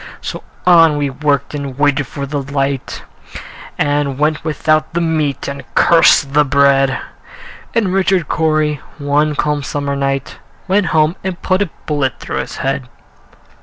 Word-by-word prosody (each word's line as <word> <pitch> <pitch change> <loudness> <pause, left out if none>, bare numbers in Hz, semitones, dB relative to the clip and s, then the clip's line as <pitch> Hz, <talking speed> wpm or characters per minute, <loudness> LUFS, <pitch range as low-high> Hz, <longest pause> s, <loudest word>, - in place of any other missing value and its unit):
So - - -6 0.2
on 165 -4 +6
we 145 -2 -1
worked, 145 +1 -1
and 140 -3 -5
waited 145 -2 +1
for 140 +2 -5
the 140 +1 -3
light, 135 -1 -3 0.7
And 145 -2 0
went 150 +1 0
without 155 0 0
the - - +2
meat, 155 -4 -1
and 140 0 -5
cursed 145 -4 +5
the 150 +1 +5
bread; 140 -1 +3 0.8
And 205 -6 +1
Richard 190 -4 +1
Cory, 155 -2 0 0.2
one 150 +1 +1
calm 150 0 0
summer 140 0 -3
night, 135 -1 -2 0.3
Went 195 0 +2
home 155 +3 +2
and 185 -2 -4
put 185 +1 +1
a 200 - 0 0.2
bullet 145 -4 -1
through - - -5
his - - -4
head. 135 -1 -2
145 Hz, 150 wpm, -16 LUFS, 140-160 Hz, 0.8 s, on